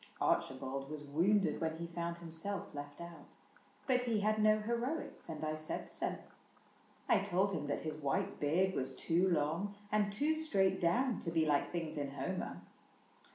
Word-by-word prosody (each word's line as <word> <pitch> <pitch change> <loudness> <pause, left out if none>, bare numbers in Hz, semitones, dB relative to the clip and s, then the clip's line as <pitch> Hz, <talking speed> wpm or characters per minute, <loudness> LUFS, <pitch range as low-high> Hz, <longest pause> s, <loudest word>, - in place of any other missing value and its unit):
Archibald 135 +1 0
Was 150 -1 -5
wounded 170 +3 +2
when 160 -1 0
he 170 - -4
found 170 0 -3
himself 170 +3 -4
left 145 0 -7
out, 170 -1 -10 0.5
But 255 -2 +3
he 225 -4 +1
had 215 +1 +2
no 215 0 +5
heroics, 235 - -2
and 155 -1 -3
I 155 - 0
said 155 0 -4
so: - - -1 0.9
I 215 - +5
told 195 0 +1
him 150 -6 -2
that 145 - -1
his 155 -1 -4
white 140 -3 -1
beard 180 +6 +2
was 130 -3 -2
too 175 +3 +2
long 170 +5 0 0.2
And 210 -1 +2
too 290 +10 +2
straight 195 -12 +2
down 240 +8 +2
to 170 - -3
be 165 -1 +2
like 145 -2 +2
things 165 -3 -3
in 140 -1 -2
Homer. 140 - -3
170 Hz, 170 wpm, -36 LUFS, 150-205 Hz, 0.9 s, no